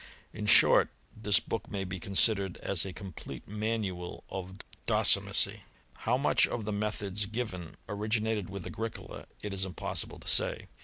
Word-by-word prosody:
In 105 0 -4
short, - - +7 0.3
this 105 -2 +3
book 115 - -4
may 100 -2 -3
be 95 0 -5
considered 100 0 +1
as 95 -3 +2
a 95 - -4
complete 95 -2 -9
manual 105 -4 -3
of 95 0 -6 0.3
docimasy. - - +4 0.3
How 120 +3 0
much 140 - +4
of 115 -3 -4
the 105 - -2
methods 105 -1 -2
given 100 -7 -5
originated 105 -1 -1
with 100 -2 -6
Agricola 115 +1 -6 0.2
it 105 -1 -3
is 95 0 -1
im 95 -2 -5
possible - - -2
to - - -12
say. - - +3
100 Hz, 155 wpm, -30 LUFS, 95-110 Hz, 0.3 s, short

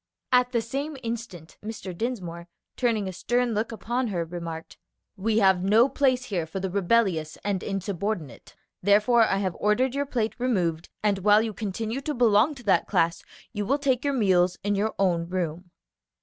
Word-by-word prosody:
At 250 0 +4
the 235 -3 0
same 280 +5 -4
instant 225 -8 -6
Mr. 210 -4 -6
Dinsmore, 175 -6 -4 0.3
turning 225 -5 0
a 190 - -5
stern 240 +5 0
look 220 +2 -1
upon 240 +3 -2
her, 175 -5 -2
remarked, 165 -1 -7 0.4
"We 215 +3 0
have 190 -4 +4
no 215 +6 +5
place 260 -2 +2
here 180 -9 -3
for 175 +4 -5
the 190 -1 -3
rebellious 190 -5 +1
and 195 -3 -1
insubordinate, 195 - -4 0.3
therefore 210 +5 +4
I 195 - +1
have 190 -3 -1
ordered 240 +5 +2
your 285 0 -1
plate 230 -5 -1
removed; 175 -10 0
and 205 -2 +2
while 210 +3 +5
you 225 -1 -3
continue 220 +5 -3
to 300 +2 -3
belong 235 +4 +4
to 245 - -12
that 205 - +2
class, 165 -3 +1 0.3
you 205 -2 -2
will 265 +8 +1
take 265 -4 0
your 285 -1 0
meals 185 -6 +3
in 205 0 +1
your 205 +2 -1
own 170 -3 +1
room." 180 -1 -3
210 Hz, 180 wpm, -26 LUFS, 180-240 Hz, 0.4 s, no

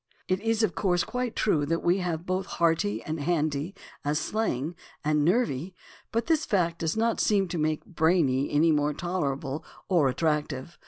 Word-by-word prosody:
It 185 0 +1
is, 225 0 +1
of 220 - +2
course, 175 -3 +1
quite 250 -2 -3
true 160 -9 +2
that 165 +2 -1
we 175 +3 +3
have 175 -2 -2
both 185 0 -1
"hearty" 160 -11 +1
and 155 +1 -4
"handy" 155 +2 -1 0.3
and 145 - 0
as - - +1
slang 170 - -1 0.3
"nervy," 160 - +1 0.4
but 230 0 0
this 320 -1 +2
fact 175 - 0
does 165 +4 -1
not 230 +1 +1
seem 200 -3 +3
to 170 -1 -2
make 155 0 0
"brainy" 160 - +2
any 160 +3 +4
more 150 -1 +1
tolerable 150 -5 -2 0.3
or 165 -8 +4
attractive. 150 +1 -2
165 Hz, 170 wpm, -27 LUFS, 150-190 Hz, 0.4 s, any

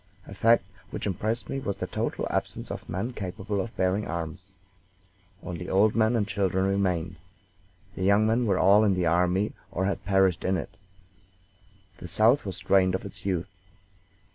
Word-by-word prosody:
A - - -10
fact 115 -2 +4 0.3
which - - -5
impressed 110 +4 -2
me 135 - -3
was 100 -7 -3
the - - -3
total - - -3
absence - - -3
of - - -7
men 105 +8 -3
capable 100 0 -3
of 115 - -7
bearing 95 +3 +1
arms. 85 +3 -6 0.9
Only 90 0 -6
old 105 +3 +4
men 110 +1 +3
and 105 -3 +1
children 95 -2 0
remained. 90 -3 0 0.8
The - - -7
young 100 +3 +4
men 115 +2 +2
were 95 -3 +2
all 100 +4 +5
in 100 -3 +3
the 90 -1 0
army 90 +5 +2 0.2
or 95 0 -2
had 100 0 -2
perished 95 -2 +2
in 95 0 +1
it. 90 +2 -6 1.2
The - - -7
South 110 - +3
was 95 -2 -4
drained 95 0 +3
of 95 - -4
its 95 -1 -7
youth. 90 -2 -2
95 Hz, 170 wpm, -27 LUFS, 90-105 Hz, 1.2 s, all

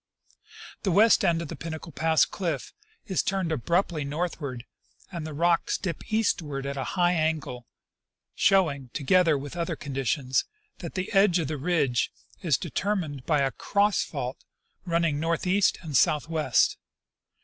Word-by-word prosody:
The 195 - 0
western 215 +3 +5
end 165 -1 0
of - - -7
the - - -5
Pinnacle 165 0 -7
pass 160 0 +3
cliff 165 -9 -4 0.3
is 190 - 0
turned 190 -4 -1
abruptly 165 +2 0
northward, 140 -4 -4 0.5
and 170 -4 -5
the 155 - -7
rocks 170 +2 +2
dip 185 +3 -5
eastward 155 -11 0
at 140 0 -3
a 135 - -2
high 175 0 +4
angle, 155 -7 -2 0.7
showing, 155 -10 +2
together 165 +1 +3
with 140 +3 -7
other 170 -1 -2
conditions, 135 -1 -1 0.3
that 170 -4 -7
the 185 0 -3
end 195 -2 +5
of 160 -5 -2
the 155 - -2
ridge 145 -5 +1 0.3
is 160 -9 +2
determined 170 -6 -3
by 150 -3 +3
a 135 -1 +1
cross 200 - +1
fault 130 -3 -5 0.4
running 170 -4 +1
northeast 180 +4 +1
and 155 -4 -5
southwest. 150 -3 +2
160 Hz, 145 wpm, -27 LUFS, 140-180 Hz, 0.7 s, western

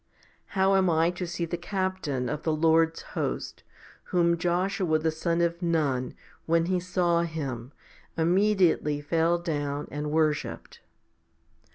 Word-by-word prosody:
How 190 +1 +4
am 190 -2 +3
I 165 +1 +3
to 180 0 -5
see 170 0 -3
the 175 +1 -3
Captain 185 -9 -2
of 150 0 -3
the 160 - 0
Lord's 160 +1 +2
host, - - -3 0.4
whom 170 -1 +2
Joshua 180 0 0
the 160 +1 0
son 170 +2 -1
of 170 +1 0
Nun, 150 -7 0 0.3
when 165 0 +3
he 185 +1 +1
saw 175 -1 +1
Him, 140 -7 -4 0.5
immediately 175 -3 +2
fell 165 +3 +1
down 145 -4 -3
and 150 +1 -3
worshipped 155 -1 -1
165 Hz, 135 wpm, -27 LUFS, 155-175 Hz, 0.5 s, How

